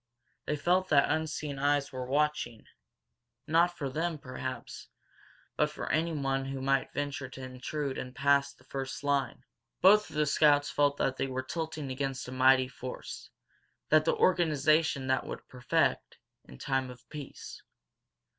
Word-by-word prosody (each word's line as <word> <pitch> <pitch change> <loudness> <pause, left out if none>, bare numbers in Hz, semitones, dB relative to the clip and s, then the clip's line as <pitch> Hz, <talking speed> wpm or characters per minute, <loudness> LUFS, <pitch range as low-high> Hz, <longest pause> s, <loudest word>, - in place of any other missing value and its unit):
They 150 - 0
felt 180 +5 +1
that 140 -2 +4
unseen 155 -2 -2
eyes 145 0 +1
were 130 -2 -5
watching, 140 -5 0 0.8
not 170 +2 +3
for 140 - -2
them, 160 +4 -2
perhaps, 130 -2 -7 0.7
but - - +2
for - - -5
anyone 140 -4 0
who 135 0 -4
might 135 0 +1
venture 140 -2 -3
to 130 0 -9
intrude 130 +2 -4
and 125 0 -7
pass 140 +1 +3
the - - -23
first 135 +1 -5
line. 140 -2 0 0.4
Both 210 +3 +6
of - - -12
the 150 0 +2
scouts 145 0 +4
felt 145 -1 +2
that 130 0 0
they - - -1
were 130 0 -3
tilting 155 -1 -4
against 135 0 -3
a - - -7
mighty 130 0 +5
force, 130 0 -8 0.6
that 155 0 +5
the - - +2
organization 155 -4 +2
that 130 0 0
would - - -7
perfect, 125 -1 0 0.3
in 65 - -13
time 135 - -1
of 125 0 -13
peace. 150 -3 -8
140 Hz, 155 wpm, -30 LUFS, 130-150 Hz, 0.8 s, Both